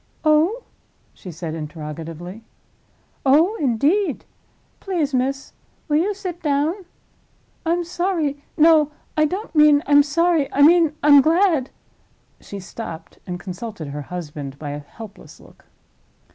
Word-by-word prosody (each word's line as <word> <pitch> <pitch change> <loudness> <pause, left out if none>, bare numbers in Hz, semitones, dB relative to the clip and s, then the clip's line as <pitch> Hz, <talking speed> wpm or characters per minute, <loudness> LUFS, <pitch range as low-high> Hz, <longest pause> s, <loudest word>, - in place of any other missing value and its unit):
"Oh?" 325 +11 +3 0.5
she 185 - -10
said, 165 -1 -6
interrogatively. 160 +4 -7 0.8
"Oh, 315 +10 +4
indeed? 295 - 0 0.5
Please, 335 -8 -2
miss, 270 +2 -2 0.3
will 295 -1 +2
you 395 +6 0
sit 360 -3 -6
down? 310 +6 -1 0.8
I'm 345 +1 +1
sorry—no, 320 -3 +1 0.3
I 310 - +3
don't 380 +8 -4
mean 300 -2 +5
I'm 290 0 +6
sorry; 325 0 +1
I 285 - +3
mean 325 -1 +5
I'm 290 -1 +8
glad—" 320 -3 +2 0.7
she 200 - -9
stopped, 175 -4 -9
and 180 -1 -5
consulted 185 -3 -7
her 145 +1 -5
husband 145 -4 -7
by 145 0 -6
a 145 - -5
helpless 205 +8 -13
look. - - -20
285 Hz, 120 wpm, -21 LUFS, -, 0.8 s, I'm